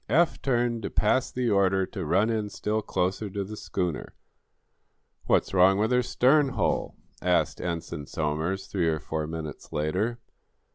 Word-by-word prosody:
Eph 165 +8 +3
turned 120 -3 +1
to - - -3
pass 115 +5 +2
the 125 -1 -1
order 95 -1 +3
to 95 -1 -6
run 100 +8 +3
in 110 -2 -1
still 105 +2 -2
closer 95 +2 -1
to 100 +1 -3
the 105 +3 -7
schooner. 90 -6 -3 1.1
"What's - - +2
wrong 95 +1 +5
with 110 +3 +1
her 125 0 +4
stern 135 +4 +3
hull?" 105 -8 0 0.3
asked - - +1
Ensign 85 -3 -4
Somers, 80 +5 -2
three 90 -4 -1
or 80 -1 +1
four 80 0 -4
minutes 80 -1 -7
later. 90 +10 -1
95 Hz, 155 wpm, -27 LUFS, 85-115 Hz, 1.1 s, wrong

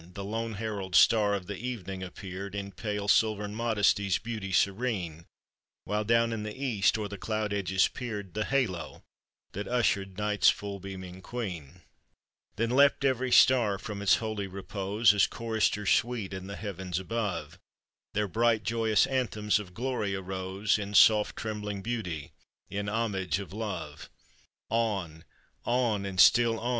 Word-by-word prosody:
— - - -18
The 100 - -5
lone 115 +1 -3
herald 100 -4 -4
star 105 0 +5
of 95 -3 -5
the 100 +1 -6
evening 100 -6 -5
appeared, 95 +1 -7
In 100 -1 -4
pale, 105 -1 -4
silvern 105 -1 +2
modesty's 105 -3 +2
beauty 110 -4 -5
serene; 95 -5 0 0.6
While 105 +1 -1
down 115 +1 +3
in 110 - -3
the 105 +2 -6
east 115 -7 +2
o'er 105 -1 -3
the 100 -1 -8
cloud 110 -1 -2
edges 95 -2 +2
peered 105 -7 -6
The 105 0 -1
halo 125 -11 -2 0.5
that 100 +1 -5
ushered 100 -6 0
Night's 105 -1 +3
full 100 -1 -3
beaming 95 -1 -8
Queen; 95 - -6 0.7
Then 115 +1 0
leapt 140 +1 +4
every 130 -1 +1
star 120 -8 +5
from 100 +1 -6
its 100 - +5
holy 110 -3 -3
repose, 100 +2 +1
As 100 -1 +4
choristers 110 -3 0
sweet 110 -3 0
in 95 0 -6
the 100 - -6
heavens 95 -4 -4
above 95 -5 -3 0.6
Their 105 0 +1
bright, 115 +2 +2
joyous 110 -2 +2
anthems 110 -5 0
of 90 -4 -10
glory 120 -5 -2
arose 95 +2 -1
In 105 0 -5
soft, 105 +1 +6
trembling 105 -2 -4
beauty, 95 -11 -4 0.4
in 100 +1 -2
homage 100 -7 -1
of 95 -3 -7
love. 110 -1 -5 0.6
On, 100 -8 -1 0.4
on! 120 -5 0
and 95 -2 -5
still 115 +2 +6
on 120 - -3
105 Hz, 150 wpm, -29 LUFS, 95-115 Hz, 0.7 s, soft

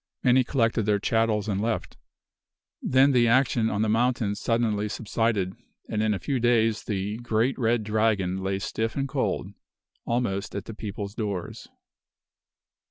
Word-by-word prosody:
Many 130 0 +5
collected 115 -4 0
their 105 -1 +3
chattels 110 0 +1
and 100 -2 -1
left. 115 0 -2 0.9
Then 135 +2 +4
the 120 -2 +4
action 115 -2 +3
on 105 +1 0
the - - +1
mountain 115 -1 +1
suddenly 110 -1 0
subsided; 110 -3 -1 0.3
and 105 - -1
in 110 0 +2
a - - -2
few 135 +5 -2
days 115 -2 +2
the 100 +1 -2
"great 120 +2 0
red 115 -1 +2
dragon" 105 -4 +1
lay 95 0 -1
stiff 110 +3 -3
and 140 0 -1
cold, 135 - -1 0.5
almost 115 -6 -2
at 100 - -4
the 115 - -7
people's 100 -1 -6
doors. 100 -6 -4
110 Hz, 150 wpm, -26 LUFS, 105-120 Hz, 0.9 s, Many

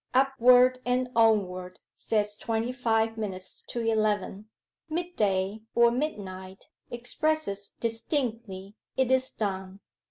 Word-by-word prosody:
"Upward 255 -1 +5
and 250 +1 0
onward" 190 -5 +2 0.2
says 210 -1 -1
twenty 225 +3 -2
five 225 -3 0
minutes 190 -4 -6
to 240 - -3
eleven. 215 -2 0 0.4
Mid 350 +2 -3
day 195 +1 0
or 235 0 +6
midnight 195 -9 -5 0.2
expresses 240 -4 -2
distinctly 225 -5 -3 0.2
"It 260 -1 +2
is 260 0 +3
done." 190 -2 -4
225 Hz, 105 wpm, -28 LUFS, 200-250 Hz, 0.4 s, or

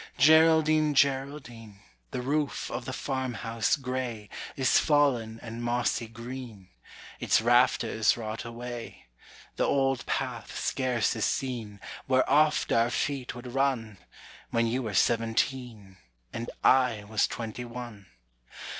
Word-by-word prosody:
Geraldine, 155 0 +5
Geraldine, 135 -6 -1 0.3
The 125 - -4
roof 145 +2 -1
of 120 - -4
the - - -4
farmhouse 125 -3 -1
gray 125 -6 -4 0.3
Is 130 -2 +3
fallen 125 -7 +2
and 115 0 -6
mossy 120 -1 0
green; 115 -3 -9 0.5
Its - - +3
rafters 115 -2 +3
rot 110 -1 -5
away: 120 0 -8 0.5
The - - +2
old 135 -2 +1
path - - -3
scarce 125 -3 0
is - - 0
seen 115 -6 -3 0.3
Where 130 -1 +3
oft 150 +1 +3
our 115 +1 +3
feet 130 +1 -2
would 120 0 -8
run, 125 -7 -1 0.5
When 115 0 +1
you 120 +3 -1
were 110 -5 -4
seventeen, 115 -3 0 0.4
And 115 +1 -4
I 125 -5 +4
was 105 0 +1
twenty 115 +1 -6
one. 120 -4 -9
120 Hz, 120 wpm, -28 LUFS, 115-135 Hz, 0.5 s, Geraldine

